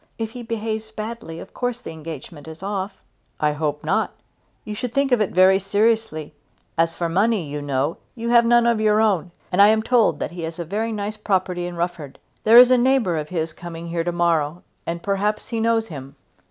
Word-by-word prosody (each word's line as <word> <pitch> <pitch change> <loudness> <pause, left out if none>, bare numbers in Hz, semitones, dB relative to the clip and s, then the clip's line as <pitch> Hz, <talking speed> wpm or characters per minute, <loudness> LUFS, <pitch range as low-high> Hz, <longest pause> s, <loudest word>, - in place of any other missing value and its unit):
If 225 -1 -3
he 245 +1 -8
behaves 220 -1 -4
badly 220 -6 -6
of 190 - -11
course 245 -1 -2
the 205 - -8
engagement 160 -1 -9
must 160 +1 -10
be - - -6
off." 195 -1 -4 0.4
"I 150 0 +2
hope 150 -1 -2
not. - - +1 0.6
You 215 - -5
should 245 +2 -5
think 275 -1 +2
of 245 -3 +4
it 210 - +1
very 185 +1 +5
seriously. 205 -5 0 0.4
As 165 0 +1
for 170 - -1
money, 195 +1 +1
you 145 +1 -5
know, 140 +2 -1 0.2
you 235 -1 -3
have 235 0 +6
none 240 0 +4
of 235 -2 +2
your 215 0 +3
own, 200 -6 +2 0.2
and 185 +2 +4
I 200 - +9
am 220 0 +3
told 235 -1 +3
that - - -4
he 175 0 -7
has 160 0 -5
a 170 - -4
very 215 +6 -2
nice 210 0 -4
property 185 -4 -1
in 175 - -6
Rufford. 170 -5 -4 0.3
There 225 +2 +7
is 250 +1 +9
a 255 - +5
neighbour 245 -8 +2
of 150 -1 -3
his 160 -3 -2
coming 170 0 -8
here 165 0 -1
to 175 - -1
morrow, 170 -1 0 0.2
and 170 0 -3
perhaps 205 +1 -1
he 230 - -2
knows 225 0 +1
him." 135 -2 -9
195 Hz, 220 wpm, -22 LUFS, 165-225 Hz, 0.6 s, I